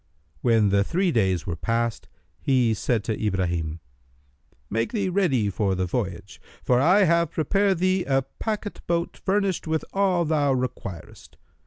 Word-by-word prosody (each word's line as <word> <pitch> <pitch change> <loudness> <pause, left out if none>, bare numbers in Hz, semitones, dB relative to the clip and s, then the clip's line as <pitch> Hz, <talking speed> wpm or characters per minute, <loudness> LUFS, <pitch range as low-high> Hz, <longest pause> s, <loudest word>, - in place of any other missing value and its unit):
When 115 -4 +3
the 100 0 +3
three 180 - 0
days 95 - +1
were 85 - -3
past, 115 +5 -2 0.3
he 125 -4 +2
said 110 0 -1
to 110 0 -3
Ibrahim, 85 -5 -1 0.9
"Make 115 +8 -2
thee 200 -4 0
ready 170 - +1
for 95 -1 0
the 95 0 -1
voyage; 95 -1 -4 0.2
for 125 -1 +3
I 180 +9 +5
have 170 -2 +3
prepared 195 +4 +1
thee 185 +1 +1
a 135 -1 +1
packet 210 - -5
boat 170 0 -1
furnished 195 -3 -1
with 160 0 -1
all 190 -3 +2
thou 145 -3 +2
requirest. 125 -8 -6
130 Hz, 150 wpm, -25 LUFS, -, 0.9 s, I